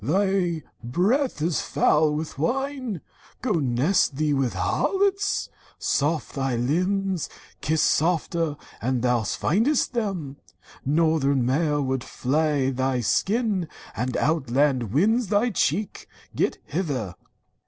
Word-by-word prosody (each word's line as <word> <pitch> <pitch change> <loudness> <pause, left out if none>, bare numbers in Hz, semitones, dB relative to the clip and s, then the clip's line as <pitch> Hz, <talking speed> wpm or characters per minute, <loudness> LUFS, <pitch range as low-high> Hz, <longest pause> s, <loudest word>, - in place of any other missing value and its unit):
Thy 180 - +1 0.2
breath 190 - +1
is 165 -1 +1
foul 150 0 +2
with 155 -2 -5
wine! 255 - -2 0.4
Go 250 - 0
nest 145 - +2
thee 150 +1 +1
with 135 -3 0
thy - - -5
harlots! 395 0 +1 0.3
Soft 150 +2 0
thy 135 -2 -1
limbs 185 +8 0 0.2
— - - -27
Kiss 155 +1 +1
softer, 165 -1 +1 0.2
an 125 +1 0
thou 125 -1 +2
find'st 225 - +1
them! 185 - -3 0.5
Northern 140 -3 +2
mail 145 +2 +1
Would 130 -1 -1
flay 140 0 0
thy 130 -1 0
skin, 200 - +1 0.3
and 125 +2 -2
outland 135 -5 +1
winds 215 - +2
thy 215 +4 +2
cheek! 195 +2 -1 0.3
Get - - 0 0.2
Either!' 140 - -2
155 Hz, 120 wpm, -25 LUFS, 135-195 Hz, 0.5 s, foul